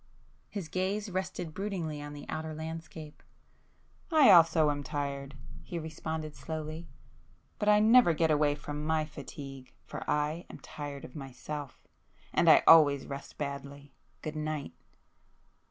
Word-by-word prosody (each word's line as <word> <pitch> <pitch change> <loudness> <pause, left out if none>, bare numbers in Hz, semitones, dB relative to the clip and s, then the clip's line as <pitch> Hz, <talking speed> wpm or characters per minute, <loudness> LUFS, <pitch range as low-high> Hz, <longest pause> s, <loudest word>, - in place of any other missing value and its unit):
His 195 -6 -5
gaze 195 +4 -2
rested 180 -3 -3
broodingly 175 -7 -3
on 145 0 -7
the 145 - -9
outer 155 0 -4
landscape. 160 -1 -8 0.9
"I 310 -4 +7
also 165 -3 +6
am 145 0 -3
tired," 140 0 -4 0.3
he 175 - -6
responded 160 -1 -5
slowly—"But 160 +6 -7
I 210 0 +6
never 220 -5 +6
get 160 0 +2
away 150 -1 +3
from 150 0 -6
my 155 0 +1
fatigue, 135 -3 -9
for - - -6
I 150 +3 0
am - - -9
tired 145 -2 -7
of 125 - -13
myself. 140 0 -7 0.5
And - - +4
I - - +8
always 145 -4 +7
rest 140 0 -8
badly. 140 -1 -6 0.3
Good 155 0 -4
night!" 155 - -3
155 Hz, 135 wpm, -30 LUFS, 145-165 Hz, 0.9 s, I